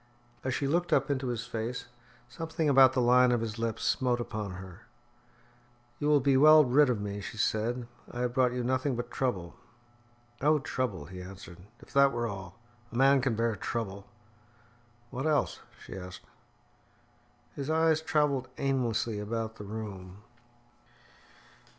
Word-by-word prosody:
As 130 -1 -1
she 140 - -1
looked 170 +5 0
up 145 - +2
into 130 -2 -1
his 120 -1 -3
face, 115 +1 -4 0.4
something 160 +5 -3
about 135 -2 +6
the 130 - +1
line 125 +1 +5
of 120 -2 +1
his 115 -1 -4
lips 115 0 -2
smote 125 +1 +1
upon 110 -5 -4
her. 95 +2 -11 1.1
"You 145 - -1
will 150 -1 +5
be 135 0 +2
well 155 +2 +8
rid 135 +3 +4
of 120 -4 0
me," 100 0 -4
she 110 - -8
said. 115 +4 0 0.2
"I 120 - -5
have 125 -1 -1
brought 125 -1 +3
you 125 0 -2
nothing 130 +2 0
but 120 - -5
trouble." 95 -10 -2 0.8
"Oh, 150 +2 +4
trouble," 125 - -3
he 90 +4 -9
answered. 90 -2 -11 0.2
"If - - -16
that 140 0 +5
were 120 0 -1
all! 95 -4 -6 0.3
A - - -9
man 135 +2 +5
can 125 -3 0
bear 115 0 0
trouble." 100 -1 -4 1.0
"What 135 +4 -2
else?" 150 -2 +1 0.2
she - - -10
asked. 90 -1 -9 1.3
His 140 0 -4
eyes 160 0 +3
travelled 150 -5 +1
aimlessly 120 -5 0
about 110 +1 -4
the 105 - -8
room. 100 -2 -7
120 Hz, 155 wpm, -30 LUFS, 105-135 Hz, 1.3 s, well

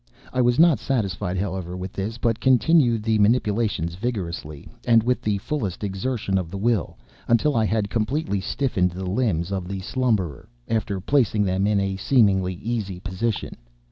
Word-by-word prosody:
I 130 - +2
was 120 0 +3
not 165 -2 +5
satisfied, 95 -8 -1
however, 90 -2 -3
with 90 +1 -6
this, 105 +4 -4
but 115 -1 0
continued 125 -2 +3
the 110 -1 +1
manipulations 105 -5 +1
vigorously, 85 - -4 0.2
and 115 -2 +4
with 125 +2 0
the 105 -1 0
fullest 105 - -3
exertion 100 0 -1
of 90 -3 -5
the 100 - -6
will, 110 -1 0 0.3
until 125 +5 +3
I 110 -1 +3
had 105 -1 -1
completely 115 -1 -1
stiffened 95 -5 0
the 95 +1 -5
limbs 95 -4 0
of 95 -2 -3
the 95 0 -4
slumberer, 105 - -1 0.2
after 105 -3 -1
placing 110 -1 +2
them 95 +1 +1
in 105 -1 +2
a 95 -1 -1
seemingly 95 -5 +2
easy 100 -3 -4
position. 100 +4 -3
105 Hz, 165 wpm, -23 LUFS, 95-120 Hz, 0.3 s, not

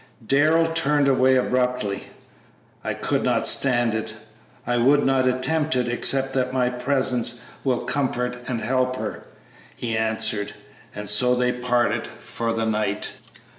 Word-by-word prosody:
Darrell 155 +6 +3
turned 150 -3 +1
away 130 -1 +4
abruptly. 125 -5 0 0.8
"I - - -2
could - - -1
not - - +1
stand 120 -4 +2
it; 110 0 -4 0.5
I 120 0 0
would 140 +5 +4
not 135 -1 +2
attempt 150 +4 0
it, 125 -1 0
except 135 +2 0
that 130 -1 0
my 125 -1 +1
presence 125 -2 0 0.2
will 130 -3 0
comfort 125 -3 -1
and 120 -3 -2
help 130 +1 0
her," 110 -4 -5 0.5
he 115 -2 -3
answered. 110 -2 -1 0.4
And 105 0 -6
so 125 +5 +3
they 125 0 +1
parted 125 -1 0
for 115 0 -5
the 115 0 -1
night. 105 -2 -1
125 Hz, 140 wpm, -23 LUFS, 115-130 Hz, 0.8 s, away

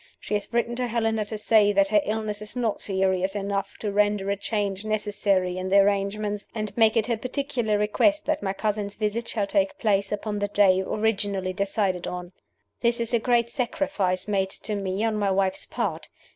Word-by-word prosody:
She - - -6
has 205 +1 -1
written 235 0 0
to 250 -1 0
Helena 225 -2 0
to 215 +1 -5
say 210 -1 +4
that 195 0 +3
her 210 -1 +4
illness 215 -1 -3
is 210 +3 -8
not 235 -4 -1
serious 190 0 0
enough 200 0 -2
to 210 - -1
render 205 -1 +1
a - - +1
change 200 -1 -2
necessary 205 -4 0
in 185 0 -3
the 195 - +5
arrangements, 205 +1 +1
and 215 -1 -2
to - - -19
make 225 0 +4
it 220 - +3
her 235 -2 0
particular 250 -3 -1
request 295 +9 +2
that 310 -1 0
my 190 - -1
cousin's 205 0 -2
visit 215 +2 -2
shall 210 -3 -1
take 290 +7 0
place 200 -3 +1
upon 210 0 -2
the 205 - 0
day 195 -2 +4
originally 200 -2 -1
decided 195 -2 -1
on. 180 0 -5 0.5
"This 235 0 +2
is 235 +1 -2
a 235 - +4
great 235 0 +2
sacrifice 220 - -1
made 195 -2 +1
to 210 - -4
me 195 +1 -2
on 220 -1 +1
my 205 -1 +1
wife's 190 0 0
part. - - -3
210 Hz, 200 wpm, -25 LUFS, 195-225 Hz, 0.5 s, the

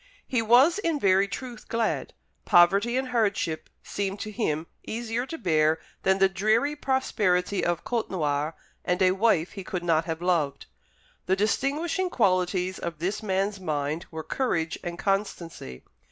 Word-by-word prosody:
He 250 -3 0
was 255 - +5
in 330 -7 0
very 195 -2 +4
truth 240 +2 -7
glad. 230 -1 -1 0.3
Poverty 200 +8 +4
and 260 0 -1
hardship 200 -9 0
seemed 200 0 -3
to 215 - -5
him 160 -8 -1 0.2
easier 235 +2 -3
to 325 - -5
bear 160 - +2 0.2
than 190 0 +3
the 195 0 +5
dreary 215 +9 +1
prosperity 205 -9 0
of 175 -1 0
Côtenoir 155 -10 -1 0.3
and 180 0 0
a 185 - +5
wife 190 -4 +2
he 200 -2 -7
could 185 -2 -4
not 165 -2 +2
have 160 -1 -3
loved. 170 -6 0 0.6
The 190 - +3
distinguishing 290 - 0
qualities 185 - +1
of 170 -2 -5
this 180 +6 -2
man's 195 0 -1
mind 155 -1 -2
were 160 -1 -6
courage 165 -11 -1
and 170 0 -5
constancy. 175 - -3
195 Hz, 150 wpm, -26 LUFS, 170-230 Hz, 0.6 s, was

